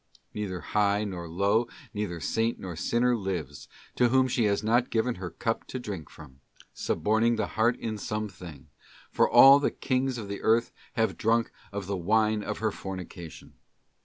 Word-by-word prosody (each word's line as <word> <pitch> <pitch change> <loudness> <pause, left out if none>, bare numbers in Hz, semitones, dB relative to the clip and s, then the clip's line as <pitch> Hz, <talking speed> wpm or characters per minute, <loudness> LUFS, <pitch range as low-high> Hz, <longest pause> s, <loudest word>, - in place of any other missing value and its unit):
'* - - -44
Neither 95 -4 -4
high 105 0 +1
nor 90 -5 -5
low, 100 +7 +1 0.3
neither 105 -5 -3
saint 115 +7 0
nor 90 -3 -6
sinner 120 +8 +1
lives, 90 - -4 0.3
to 125 -1 +4
whom 130 +1 +4
she 120 -2 +1
has 100 0 +1
not 120 +3 +2
given 120 +2 +1
her 90 - -4
cup 115 +7 -3
to 130 - -5
drink 100 - -6
from, 70 -3 -14 0.3
suborning 110 +2 +1
the - - -2
heart 115 +2 +2
in 110 -2 -4
some 105 +1 -3
thing; 85 -7 -12 0.4
for - - +3
all 135 +1 +9
the 145 - +1
kings 130 0 -1
of 110 -3 -6
the 100 0 -5
earth 115 +1 +2 0.2
have 110 +2 0
drunk 115 0 +2 0.2
of 100 -1 -4
the 100 0 -2
wine 105 +4 +2
of - - -4
her 110 0 0
fornication. 90 -4 -8
105 Hz, 180 wpm, -28 LUFS, 95-115 Hz, 0.4 s, all